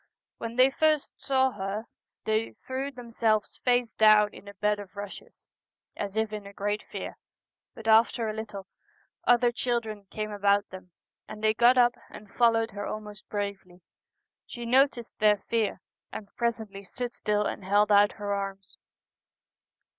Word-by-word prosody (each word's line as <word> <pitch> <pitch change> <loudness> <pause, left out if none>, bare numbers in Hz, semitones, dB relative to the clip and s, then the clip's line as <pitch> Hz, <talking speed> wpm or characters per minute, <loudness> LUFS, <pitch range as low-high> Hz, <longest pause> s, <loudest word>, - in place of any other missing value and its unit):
When 230 0 -5
they 255 +2 +5
first 310 0 +1
saw 265 -1 +2
her 205 +1 -4 0.4
they 220 +1 +1
169 - - -15
The - - -37
threw 265 +2 -3
themselves 230 -4 -1
face 245 -2 +2
down 215 -1 +5
in 205 - -13
a 200 - -10
bed 210 +1 +1
of 205 - -7
Celtic - - -36
Twilight, - - -31
rushes, 200 -1 -9 0.5
as 200 0 -4
if 220 -1 0
in 210 -1 -6
a 200 - -11
great 205 +1 -2
fear; - - -7 0.6
but 225 -1 -9
after 225 +1 +4
a 215 - -2
little 210 -3 -6 0.6
other 245 0 +4
children 230 -4 -3
came 215 0 -4
about 200 0 +2
them, 185 -1 -10 0.4
and 215 - -9
they 215 0 +4
got 240 +3 +5
up 240 -1 +5 0.2
and 205 -1 -13
followed 230 -1 +3
her 205 +1 -5
almost 210 -2 -7
bravely. 200 -3 -5 0.7
She 240 -2 -7
noticed 250 -1 +2
their 210 -1 +5
fear, 215 -1 -1 0.3
and 205 -2 -9
presently 220 -4 -2
stood 245 +5 -5
still 210 0 0
and - - -4
held 205 +2 +3
out 205 0 +6
her 205 -1 -3
arms. 195 -1 -5
215 Hz, 170 wpm, -28 LUFS, 205-235 Hz, 0.7 s, out